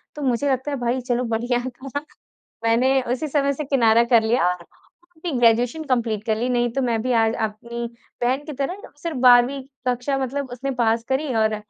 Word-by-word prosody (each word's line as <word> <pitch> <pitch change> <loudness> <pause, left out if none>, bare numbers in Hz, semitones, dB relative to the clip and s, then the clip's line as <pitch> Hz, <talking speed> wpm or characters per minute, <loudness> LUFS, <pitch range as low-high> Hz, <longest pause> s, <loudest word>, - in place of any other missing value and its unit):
तो 300 - -7
मुझे 265 +1 +1
लगता 260 +3 -1
है 280 - -2
भाई 245 +2 0
चलो 245 0 -1
बढ़िया 240 +2 0
था। 270 +3 -6 0.6
मैंने 260 +4 +3
उसी 260 +5 -1
समय 280 -1 +1
से 300 - -4
किनारा 235 -4 +4
कर 235 -2 +4
लिया। 220 -4 +2
और 180 -1 -3 0.5
अपनी 325 0 -5
ग्रेजुएशन 240 +6 +3
कंप्लीट 230 -5 0
कर 220 -2 +1
ली 240 - -1
नहीं, 240 -1 +1
तो 270 - 0
मैं 230 -3 0
भी 255 - -1
आज 225 -1 +3
अपनी 235 +2 -4 0.4
बहन 260 +4 +1
की 305 - -6
तरह 315 +10 -3 0.2
सिर्फ 330 -5 -3
12वीं 250 +2 +5 0.3
कक्षा 250 +3 0
मतलब 265 +1 -3
उसने 270 +2 -3
पास 230 0 +2
करी 265 +1 0
और 220 -1 +2
250 Hz, 195 wpm, -22 LUFS, 235-275 Hz, 0.6 s, 12वीं